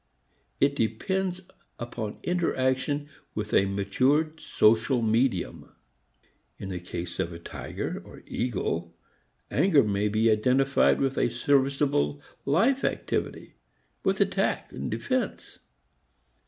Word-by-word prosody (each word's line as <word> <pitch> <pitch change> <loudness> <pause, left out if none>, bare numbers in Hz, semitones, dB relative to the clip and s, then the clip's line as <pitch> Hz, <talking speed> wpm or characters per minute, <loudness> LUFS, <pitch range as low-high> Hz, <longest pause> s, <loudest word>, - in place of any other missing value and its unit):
It 140 0 +3
depends 180 - -1 0.4
upon 120 -3 -5
interaction 145 -4 0 0.3
with 105 0 -4
a 100 - +4
matured 130 +11 +1
social 115 +3 +3
medium. 115 +4 0 0.8
In 95 - -6
the 90 -2 -4
case 85 0 -6
of 85 - -1
a 85 - -7
tiger 85 - -5
or - - -13
eagle, 85 -8 -2 0.6
anger 155 0 +4
may 105 -1 0
be 110 +2 +3
identified 130 +5 +3
with 135 -1 0
a - - +2
serviceable 135 - +1 0.3
life 230 - +3
activity, - - -2 0.5
with - - +1
attack - - 0
and - - -4
defense. 255 -5 -2
125 Hz, 110 wpm, -27 LUFS, 105-145 Hz, 0.8 s, a